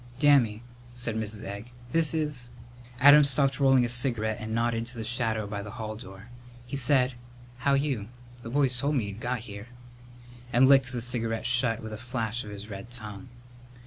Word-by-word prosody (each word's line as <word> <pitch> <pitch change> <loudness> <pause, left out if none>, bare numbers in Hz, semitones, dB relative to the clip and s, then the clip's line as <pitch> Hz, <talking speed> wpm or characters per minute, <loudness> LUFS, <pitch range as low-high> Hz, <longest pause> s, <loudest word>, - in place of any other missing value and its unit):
"Dammy," 130 -6 +3 0.3
said 120 -2 -2
Mrs. 110 -1 -4
Egg, 100 +3 -7 0.2
"this 165 0 +3
is 150 -6 -2 0.3
" 120 0 -19
Adam 145 +2 +8
stopped 140 -1 +2
rolling 135 -3 +4
a - - -1
cigarette 120 -3 +1
and 110 0 -6
nodded 115 0 -1
to 120 0 -4
the 110 - -4
shadow 110 -2 0
by 100 0 -5
the 105 - -8
hall 110 -1 -5
door. 105 -1 -12 0.4
He 125 - -6
said, 130 -1 +4 0.5
"How 140 +2 +2
you? 135 -7 -1 0.3
The 115 - -8
boys 135 0 +2
told 140 +4 0
me 110 -6 -1
you'd 100 +2 -8
got 125 0 -3
here," 105 -1 -9 0.8
and 130 +2 +5
licked 135 -2 +5
the 120 -2 -3
cigarette 115 -2 -2
shut 120 -2 +1
with 110 -1 -7
a - - -5
flash 120 -1 -4
of 105 - -9
his 105 0 -8
red 100 +2 -8
tongue. 110 0 -8
120 Hz, 190 wpm, -27 LUFS, 110-130 Hz, 0.8 s, Adam